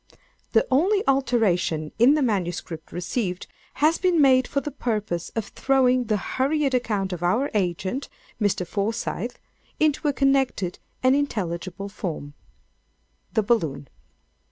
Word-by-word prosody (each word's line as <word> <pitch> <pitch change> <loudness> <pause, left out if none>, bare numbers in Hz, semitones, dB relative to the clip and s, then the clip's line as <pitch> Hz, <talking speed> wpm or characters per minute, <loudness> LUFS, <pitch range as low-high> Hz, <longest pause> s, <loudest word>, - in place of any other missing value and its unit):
The 225 - +4
only 390 +10 +3
alteration 215 - +1
in 255 +6 +6
the 300 - +2
MS. 190 -8 0 0.3
received, 180 +1 -3 0.3
has 310 +3 +3
been 360 -3 +2
made 260 -3 +5
for 280 - 0
the 295 - -5
purpose 210 - -2
of 225 -2 -3
throwing 255 -2 +2
the 215 -2 +1
hurried 275 +7 0
account 210 -6 0
of 175 - -5
our 215 +11 +1
agent, 195 +6 -1 0.3
Mr. 200 -3 +1
Forsyth, 220 +5 -2 0.4
into 305 0 +2
a 290 - +2
connected 270 -10 +1 0.2
and 260 +1 +5
intelligible 195 -8 -2
form. 165 -8 -5 1.0
"THE 220 - +3
BALLOON. 165 - 0
230 Hz, 130 wpm, -24 LUFS, 185-270 Hz, 1.0 s, in